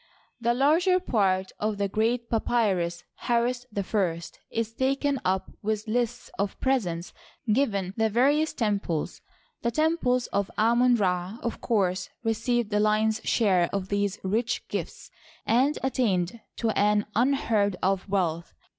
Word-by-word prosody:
The 235 0 +1
larger 330 +8 +3
part 190 - +1
of 210 0 -1
the 200 0 0
great 230 +4 0
papyrus 200 -7 0
Harris 245 +1 0
I 185 -4 0 0.3
is 225 0 -2
taken 275 +2 0
up 185 0 -1
with 215 +1 -2
lists 240 +1 -2
of 200 0 -2
presents 185 -11 -1 0.3
g^ven 210 -6 +1
the 220 -1 +2
various 285 +8 +3
temples. 200 -8 -2 0.4
The 235 - +1
temples 255 -3 +1
of 200 -1 0
Amon 240 +3 +4
Ra, 185 -1 -1
of 235 - -3
course, 185 -5 0
received 230 0 0
the 210 - +2
lion's 215 +1 +2
share 185 -7 +3
of 195 -1 -3
these 200 -1 0
rich 225 +5 -1
gifts, - - -5 0.3
and 265 +6 +2
attained 225 -7 0 0.2
to 225 -2 0
an 210 0 +2
unheard 230 -5 +2
of 195 +1 0
wealth. 170 -4 -1
220 Hz, 135 wpm, -26 LUFS, 195-245 Hz, 0.4 s, Amon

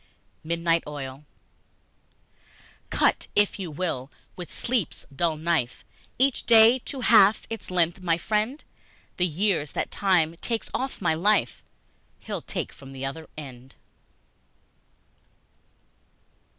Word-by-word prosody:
Midnight 165 +1 +1
Oil 140 -1 -7 1.6
CUT - - +2
if 205 0 +2
you 185 -3 -4
will, 150 -5 -3 0.3
with 180 -3 -8
Sleep's 240 -7 -2
dull 160 +1 0
knife, 160 -6 -1 0.3
Each 265 +1 +2
day 230 +2 +7
to 270 - -5
half 215 -3 +5
its 225 - -6
length, 175 0 +1
my 170 -2 +1
friend, 215 - -1 0.5
The 180 - +2
years 170 -2 0
that - - -2
Time 170 -4 +2
takes 230 +4 -3
off 260 -5 -3
my 170 - +3
life, 175 - +1 0.6
He'll - - -5
take - - -5
from 135 0 -12
the 135 0 -5
other 155 +4 -6
end! 130 -3 -10
170 Hz, 115 wpm, -26 LUFS, 150-210 Hz, 1.6 s, day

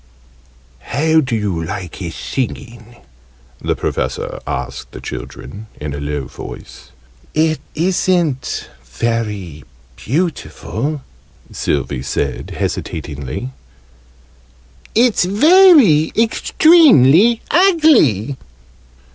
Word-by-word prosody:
"How 160 - +1
do 130 -5 -2
you 100 -7 -2
like 90 +2 -6
his 85 -4 -6
singing?" 120 -3 -5 0.7
the - - -1
Professor - - -3
asked - - -5
the - - -8
children 100 - -8
in 75 -1 -5
a 70 - -5
low 70 -1 -3
voice. - - -11 0.5
"It 155 -1 +1 0.2
isn't 170 -5 0 0.2
very 100 - -3 0.3
beautiful," 150 - -3 0.5
Sylvie 65 - -2
said, 65 - -3
hesitatingly. 70 -4 -4 1.4
"It's 235 -2 +3
very 260 - +5
extremely 230 - +5
ugly!" 295 - +3
135 Hz, 80 wpm, -17 LUFS, -, 1.4 s, very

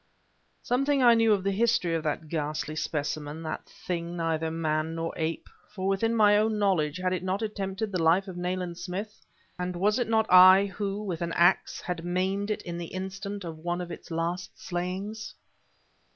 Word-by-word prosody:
Something 275 +2 +2
I 240 -1 +8
knew 225 -1 +4
of 200 -3 +2
the 195 - +1
history 215 -4 +2
of 165 - 0
that 155 +1 -2
ghastly 155 -1 -3
specimen, 150 0 -3
that 155 - -5
thing 175 -1 -5
neither 165 -1 0
man 160 0 -1
nor 165 0 -3
ape; 160 0 -3 0.3
for 190 -1 -2
within 225 +4 +1
my 205 -2 +6
own 215 0 +2
knowledge 185 -7 +1
had 185 0 0
it 180 - -2
not 185 +3 -2
attempted 205 0 -3
the 185 -3 -1
life 170 +5 +3
of 185 - -7
Nayland 180 -1 -3
Smith, 195 +4 -6 0.4
and 180 0 -2
was 210 +6 +2
it 240 - -1
not 220 -1 +3
I 185 +2 +8
who, 200 +1 -3
with 180 -5 -4
an 170 -1 -2
ax, 175 +2 +3
had 175 -2 -4
maimed 190 +3 -1
it 215 - -2
in 170 -1 -5
the 170 - -5
instant 195 +2 -5
of 165 -2 -7
one 175 +2 -2
of 175 -1 -5
its - - -9
last 170 +2 -3
slayings? 190 +5 -4
185 Hz, 190 wpm, -28 LUFS, 165-205 Hz, 0.4 s, I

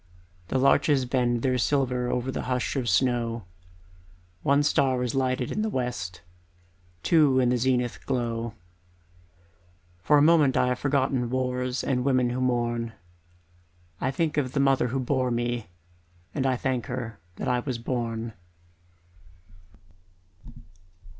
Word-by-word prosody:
The 130 - -1
larches 135 0 +3
bend 120 -2 0
their 130 -1 +1
silver 125 -2 +1
Over 125 +2 -1
the - - -3
hush 125 +2 -1
of 125 -4 -1
snow; 115 +1 +1 1.0
One 140 +6 +3
star 130 -3 +2
is 125 - -2
lighted 130 -2 0
in 215 - -1
the 220 - 0
west, 120 - -3 0.8
Two 150 -6 +4
in 125 -1 +3
the 125 - +2
zenith 125 -1 0
glow. 115 -3 -2 1.5
For 145 - +4
a - - +5
moment 155 -4 +5
I 125 - +3
have 125 0 -1
forgotten 135 -3 0
Wars 125 0 -1
and 125 -2 0
women 130 -2 +2
who 125 +1 -2
mourn 120 -2 0 1.1
I 130 - 0
think 150 +3 -1
of 130 -3 0
the 140 - 0
mother 135 -2 +3
who 130 +3 -2
bore 130 0 0
me 120 -1 -2 0.7
And 135 -3 0
thank 130 -2 -1
her 120 -5 -5 0.2
that - - -5
I 125 0 +2
was 125 -1 -3
born. 115 -2 -3
125 Hz, 135 wpm, -26 LUFS, 120-135 Hz, 1.5 s, a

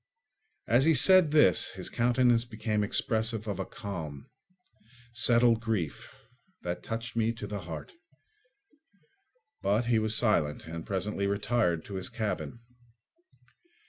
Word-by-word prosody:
As 120 +4 +4
he 160 -1 +4
said 180 +4 +6
this 145 - +4
his - - -6
countenance 120 0 +2
became 110 -2 -2
expressive 110 +1 -1
of 100 -4 -3
a - - -3
calm, 80 -8 -7 0.8
settled 120 0 +4
grief 105 -10 -3 0.5
that 90 0 -4
touched 115 +1 -5
me 115 0 +1
to 115 -2 -7
the 105 0 -5
heart. 80 - -7 1.7
But 105 +4 +1
he 115 -1 +2
was 110 0 +1
silent 90 -11 +1
and 85 0 -7
presently 100 +1 -2
retired 100 -4 0
to 100 - -6
his 95 - -4
cabin. 115 0 -4
110 Hz, 125 wpm, -29 LUFS, 100-120 Hz, 1.7 s, said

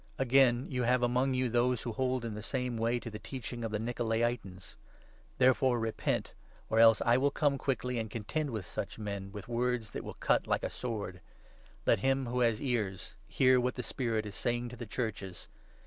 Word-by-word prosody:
Again 130 -1 +4
you 125 -1 -2
have 125 +1 +2
among 125 +2 +2
you 130 0 +1
those 120 0 +1
who 120 - -3
hold 125 +2 -1
in 115 - -3
the 105 - -6
same 125 +2 -2
15 - - -3
way 115 +2 +2
to 115 - -7
the 105 - -7
Teaching 120 +1 -6
of 115 - -1
the 105 - -1
Nikolai'tans. 115 -4 -2 0.6
Therefore 130 0 +4
repent, 115 -1 -1 0.4
or 110 - +2
16 - - +8
else, 115 -2 +7
I 120 +1 +5
will 140 +2 +3
come 140 -1 +1
quickly 125 -2 -1
and 110 -1 -3
contend 130 +8 -2
with 110 -6 -4
such 100 +3 -5
men 100 -2 -5
with 105 -2 -8
words 120 -2 -1
that - - -5
will - - -7
cut - - +1
like - - 0
a - - -2
sword. 105 -7 -5 0.6
Let - - +4
him 135 +3 +1
who 125 +1 -2
has 115 -3 +3
17 140 - -4
ears 95 -5 -3
hear 130 -1 +4
what 125 +1 0
the 125 - -4
Spirit 115 -5 -1
is 105 - -6
saying 120 +4 -1
to 125 - -9
the 120 -1 -7
Churches. 100 -6 -4
120 Hz, 210 wpm, -32 LUFS, 110-125 Hz, 0.6 s, 16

